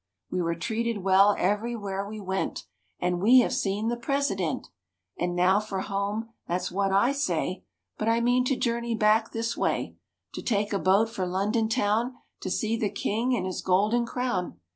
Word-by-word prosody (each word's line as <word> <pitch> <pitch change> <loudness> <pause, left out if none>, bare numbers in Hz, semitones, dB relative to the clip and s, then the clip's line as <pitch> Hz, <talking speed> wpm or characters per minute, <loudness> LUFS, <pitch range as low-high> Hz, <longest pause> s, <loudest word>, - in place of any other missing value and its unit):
We 180 - 0
Were 170 -1 0
treated 225 +3 -2
well 195 +2 +5
everywhere 205 -1 -1
we 215 0 -7
went; 190 -1 -3 0.4
And 180 0 0
we 250 +5 +7
have - - 0
seen 205 +2 -1
the 240 - 0
President. 240 - -1 0.5
And 175 0 -2
now 185 +3 +4
for 205 -3 -4
home, 205 +3 -2 0.2
that's 175 +2 -2
what 195 +1 0
I 200 +7 +4
say; 285 +2 -2 0.3
But 215 - +1
I 230 +1 +3
mean 245 +1 +3
to 270 - +1
journey 235 -1 -1
back 220 +1 +3
this 230 0 -2
way - - -1 0.4
To - - -5
take 210 -2 0
a 200 - +1
boat 195 +5 +4
for 195 -5 -3
London 210 +5 0
town 230 +1 +1 0.2
To 185 - -4
see 220 +4 0
the 220 -2 0
king 225 +5 0
and 235 - -2
his 185 -1 -3
golden 210 +6 +2
crown." 230 - -2
210 Hz, 180 wpm, -27 LUFS, 195-235 Hz, 0.5 s, we